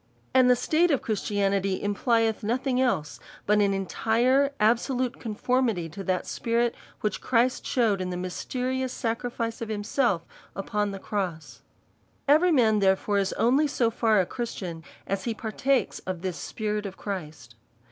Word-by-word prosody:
And 255 -1 +6
the 250 - +6
state 315 +8 +2
of 280 -5 +1
Christianity 200 -3 0
implieth 225 +2 +1
nothing 250 +4 0
else 190 -13 0 0.3
but 210 +1 +3
an 200 -1 +3
entire, 230 +8 +2
absohite 245 +3 +1
conformity 225 -4 0
to 195 +5 -7
that 185 -1 -1
spirit 235 0 0 0.3
which 210 -4 -1
Christ 250 +1 +1
shewed 220 -6 +2
in 180 - -2
the 180 - -3
mysterious 255 +8 -3
sacrifice 230 -1 -3
of 225 - -4
himself 205 -2 0 0.3
upon 205 +1 -1
the 195 - -5
cross. 185 -5 -4 0.7
Every 315 +5 +5
man, 225 -8 +4
therefore, 195 +1 +2
is 195 -1 0
only 270 +6 +3
so 240 -5 +1
far 220 -2 +3
a 185 - +3
Christian 180 -8 -5 0.2
as 195 -1 -3
he 230 -2 -1
partakes 245 +4 0
of 185 -2 -3
tliis 185 -1 -2
Spirit 210 +3 -3
of 190 - -9
Christ. 150 - -6
220 Hz, 150 wpm, -26 LUFS, 195-250 Hz, 0.7 s, And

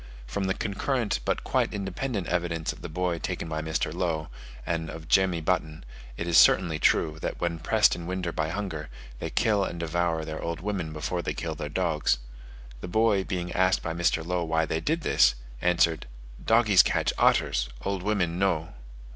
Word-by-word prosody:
From 95 +11 -3
the 95 - 0
concurrent, 115 +3 -1
but - - -1
quite - - 0
independent 100 +2 -3
evidence 85 -2 -1
of - - -15
the - - -6
boy 85 +1 -1
taken - - -4
by 80 -1 -3
Mr. 80 -1 -2
Low, 85 -3 -2 0.4
and 80 -1 -2
of 80 -1 -8
Jemmy 95 -3 +3
Button, 80 -3 -1 0.3
it 85 - -3
is 85 -1 +6
certainly 85 -4 +4
true, 80 +1 +2
that - - -3
when 85 -1 -1
pressed - - +3
in 85 -1 -7
winter 90 -1 -2
by 80 -1 -2
hunger, 85 -5 -4 0.3
they - - -3
kill 105 -3 +2
and 85 -2 -4
devour 85 -1 -1
their 80 0 -5
old 85 0 -3
women 90 -3 -3
before 80 +3 -3
they - - -3
kill 80 -1 -3
their 75 -1 -5
dogs: 80 -5 +1 0.6
the - - -6
boy, 105 0 +2
being 90 -2 -3
asked 95 0 +2
by 80 - -2
Mr. 85 -1 +1
Low 90 0 -1
why 80 0 +1
they 80 - -1
did 160 - -1
this, - - +4 0.3
answered, 85 -2 +2 0.4
"Doggies 110 -4 +6
catch - - 0
otters, - - +3 0.2
old 100 -1 -1
women 90 -4 0
no." 90 -5 0
85 Hz, 185 wpm, -27 LUFS, 80-95 Hz, 0.6 s, is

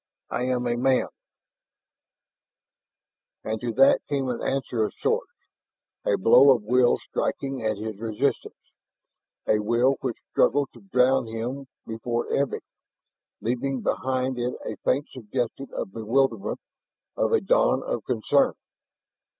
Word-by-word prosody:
I 125 - -1
am 125 -1 0
a 120 0 +1
man 130 +2 +2 1.6
" - - -66
And 110 0 -3
to 120 - -2
that 135 +4 +6
came 135 -2 -1
an 120 - -3
answer 130 -4 -1
of 105 - -3
sorts, - - 0 0.7
a 100 - +2
blow 115 +8 +7
of 115 - -5
will 125 +3 +3
striking 135 -3 -2
at 110 -1 0
his 110 -1 -6
resistance, 110 -2 -2 0.9
a 105 - +3
will 120 +5 +2
which 125 -3 -3
struggled 140 +2 +2
to - - -15
drown 130 -8 +2
him 120 +5 -5 0.2
before 115 +1 -3
ebbing, 140 -1 0 0.8
leaving 125 +3 -1
behind 130 -1 -1
it 125 +1 -1
a - - -4
faint 140 +3 0
suggestion 125 +2 -4
of 95 - -4
bewilderment, 115 -1 0 0.6
of - - +1
a 455 - +4
dawn - - +2
of - - -2
concern. - - +2
125 Hz, 135 wpm, -25 LUFS, 115-135 Hz, 1.6 s, blow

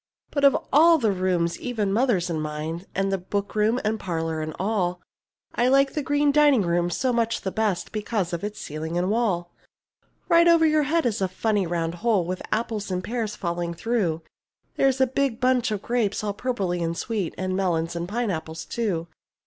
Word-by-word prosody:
But 285 - -1
of 280 - +6 0.2
all 330 +4 +7
of 305 - -2
the 215 - +4
rooms, 180 -3 0
even 215 -6 -1
mother's 215 -6 +2
and 165 -3 -2
mine, 155 +4 -4
And 195 +1 0
the 195 - 0
bookroom, 210 +5 0
and 215 +1 0
parlour 165 -3 -2
and 155 0 -5
all, 185 -3 -1 0.5
I 240 - +2
like 275 +1 +4
the 300 - -1
green 290 +1 +2
dining 290 -6 +5
room 175 0 +1
so 250 +8 0
much 230 -1 0
the 190 - -3
best 205 -5 -1
Because 210 -4 -2
of 170 - -3
its 210 0 -4
ceiling 160 +3 -4
and 180 +3 +1
wall. 190 -7 0 0.8
Right 335 0 +5
over 335 -1 +6
your 310 -1 +4
head 330 -1 +2
is 225 -3 0
a 190 - +2
funny 200 +1 0
round 165 -1 -1
hole 215 -6 +2
With 185 +1 -4
apples 220 -3 -2
and 185 -1 -2
pears 225 -2 -3
falling 170 -1 -3
through; 180 -7 -1 0.5
There's 270 -1 +2
a 265 - +5
big 260 -2 -1
bunch 255 -2 +2
of 210 -2 -3
grapes 225 -4 0
all 205 -1 -1
purply 200 -6 -2
and 165 0 -2
sweet, 210 -7 -3
And 185 0 -2
melons 170 -3 0
and 170 +1 -4
pineapples 165 -8 -3
too. 195 -8 -2
205 Hz, 195 wpm, -25 LUFS, 175-240 Hz, 0.8 s, all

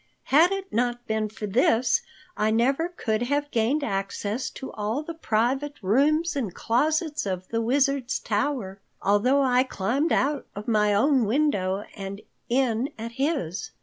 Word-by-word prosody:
"Had 330 +6 +6
it 390 0 -4
not 240 +1 0
been 220 -2 -1
for 215 0 -6
this, 245 - +2 0.3
I 215 - +1
never 270 +9 +2
could 220 -11 -2
have 285 +4 -1
gained 245 +6 +1
access 200 +2 -2
to 265 - -8
all 220 +7 -2
the 335 - -6
private 270 +1 0
rooms 305 - +2
and 240 -9 -2
closets 300 +3 0
of 185 -1 -3
the 230 0 -1
Wizard's 270 +1 +1
tower, 210 -3 -2 0.2
although 250 +8 +3
I 250 -1 +4
climbed 260 - -1
out 285 0 +1
of 205 +1 -7
my 210 -2 +3
own 255 +4 +3
window 205 -6 +1
and 195 0 -6 0.3
in 245 0 +1
at 230 +1 -6
his. 250 - -2
245 Hz, 150 wpm, -25 LUFS, 215-285 Hz, 0.3 s, Had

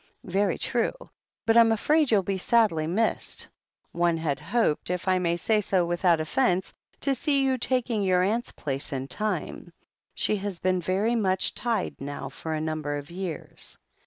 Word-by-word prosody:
"Very 195 0 +1
true. 240 -1 0 0.5
But 225 - +3
I'm 230 -1 +7
afraid 295 +6 +2
you'll 205 -4 +3
be 195 +1 -1
sadly 200 -8 +3
missed. 215 +7 -1 0.4
One 170 -1 +1
had 150 -4 -1
hoped, 225 -12 0
if 180 +1 -3
I 185 0 +3
may 170 -1 0
say 215 +4 +2
so 185 -3 +1
without 175 -1 +2
offence, 185 +3 0 0.3
to 275 - +1
see 275 +1 +1
you 260 -1 +1
taking 245 -3 0
your 185 -2 +3
aimt's 225 +5 0
place 140 +2 -4
in 135 -1 -3
time. 185 +1 -1 0.4
She 215 - 0
has 195 -3 -5
been 185 -1 +1
very 195 +7 +1
much 190 -5 +1
tied 235 - -2
now 140 -1 -5
for 160 +3 -5
a - - -2
nimiber 155 -2 -2
of 145 +2 -8
years." 180 -2 -6
185 Hz, 170 wpm, -26 LUFS, 165-225 Hz, 0.5 s, I'm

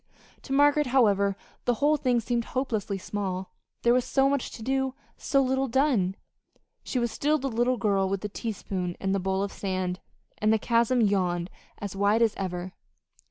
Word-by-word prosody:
To - - -10
Margaret, 290 +1 +4
however, 200 -6 +3 0.3
the 245 - +2
whole 290 +5 +3
thing 250 -4 +1
seemed 235 0 -1
hopelessly 220 -7 -2
small: 190 -1 -4 0.3
there 235 - +5
was 250 0 +3
so 270 +2 +2
much 280 -2 0
to 225 - -8
do, 265 +1 0 0.2
so 275 -1 +1
little 265 +1 +1
done! 240 -8 +2 0.7
She - - -3
was 235 -2 0
still 300 +5 +1
the 270 -2 -3
little 240 +2 +1
girl 195 -3 +1
with 195 -1 -2
the 210 - -3
teaspoon 195 -4 -4
and 195 0 0
the 195 - +1
bowl 190 +1 0
of 200 - -3
sand; 185 -2 -3 0.4
and 215 +1 +3
the 220 - +4
chasm 235 +2 +2
yawned 185 -4 +1 0.3
as 200 -2 -6
wide 205 +3 +3
as 225 - +2
ever. 185 -1 -4
220 Hz, 180 wpm, -27 LUFS, 195-260 Hz, 0.7 s, there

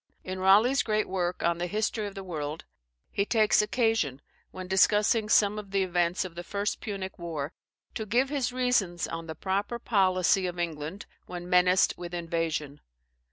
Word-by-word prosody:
In 185 0 -5
Raleigh's 215 +8 +5
great 215 -2 0
work 180 -2 -2
on 170 0 +1
the 175 - -1
"History 215 +2 -1
of 200 - -9
the 195 - -6
World," 155 -3 -5 0.5
he 200 - +1
takes 215 0 +3
occasion, 225 - 0 0.3
when 185 0 -8
discussing 210 +3 +3
some 210 -1 +4
of 205 -2 -9
the 195 0 +1
events 175 0 0
of 180 - -8
the 175 +1 -7
first 200 +3 -3
Punic 195 -4 -5
war, 160 -4 -4 0.4
to 220 - -4
give 250 +6 +2
his 275 -4 -1
reasonings 245 -9 0
on 165 0 -6
the 160 - -6
proper 200 +7 -2
policy 190 -4 +2
of 175 0 -5
England 165 +1 -4 0.2
when 175 -1 -7
menaced 180 0 +3
with 175 0 -6
invasion. 165 -4 -3
190 Hz, 170 wpm, -28 LUFS, 175-210 Hz, 0.5 s, Raleigh's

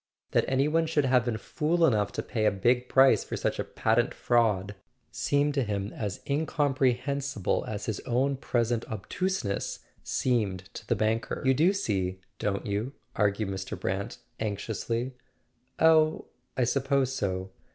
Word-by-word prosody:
That - - +3
any 135 +2 +2
one 165 +1 +2
should 150 -3 +2
have 125 -2 +3
been 120 -3 -1
fool 165 +8 +1
enough 105 -8 +2
to - - -3
pay 110 -4 -1
a - - +4
big 125 +6 +1
price 135 0 +5
for - - -5
such - - -1
a - - +1
patent 115 +2 +1
fraud 105 -5 +2 0.4
seemed 145 +1 +1
to 140 -2 +1
him 100 -2 -3
as 100 -3 -4
incompre¬ 140 -3 +1
hensible 140 -6 -1
as 105 -1 -4
his 110 -4 -2
own 130 +3 0
present 120 -2 0
obtuseness 110 - -2 0.2
seemed 105 -8 0
to - - -9
the - - +2
banker. 110 +1 -1
"You 130 - +5
do 160 +8 +4
see, 95 - -1 0.2
don't 100 -1 -1
you?" 105 +6 -2 0.2
argued 105 0 +1
Mr. 95 0 -5
Brant - - -3 0.2
anx¬ 105 -2 -2
iously. 115 +3 -2 0.7
"Oh, 160 -1 +4 0.3
I 130 - +3
suppose 135 +1 +1
so." 95 -6 -2
120 Hz, 160 wpm, -28 LUFS, 105-140 Hz, 0.7 s, price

